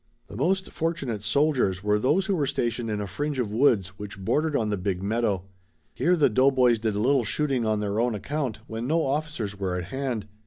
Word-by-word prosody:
The - - -9
most 190 - 0
fortunate 140 -10 -2
soldiers 110 -5 +1
were 105 0 +2
those 155 - +2
who 195 - +1
were 145 -5 0
stationed 120 -3 -1
in 105 -1 -1
a 105 - -2
fringe 145 +9 -3
of 120 -5 -1
woods 110 -5 +3
which 105 0 -7
bordered 150 +10 0
on 110 -4 +1
the 105 - 0
big 95 -1 -2
meadow. 105 -3 0 0.5
Here 180 +2 +2
the 155 - +4
doughboys 130 -1 +4
did 110 -2 -1
a - - -1
little 130 +3 +3
shooting 135 -2 0
on 110 -1 +1
their 105 +1 -1
own 120 -1 +1
account 130 0 -3
when 115 +1 -5
no 160 +3 +2
officers 135 -8 -2
were 95 -2 -1
at 90 - -3
hand. 130 -6 -2
120 Hz, 210 wpm, -26 LUFS, 105-145 Hz, 0.5 s, the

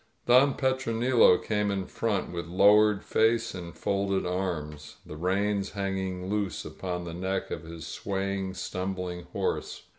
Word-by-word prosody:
Don 130 +3 +5
Petronilo 125 -5 +3
came 105 -1 -1
in 95 -2 -1
front, 105 -2 -2
with 85 -1 -5
lowered 105 +3 +5
face 115 +1 +2
and 85 -2 -8
folded 100 -1 0
arms, 80 -5 -3
the 75 - -8
reins 100 +4 0
hanging 95 -2 -3
loose 100 -5 -2
upon 90 -2 -4
the 85 -1 -6
neck 95 +3 -3
of - - -3
his 80 0 -8
swaying, 95 +2 -3
stumbUng 90 -2 -4
horse. 90 - -3
95 Hz, 140 wpm, -28 LUFS, 90-105 Hz, -, Don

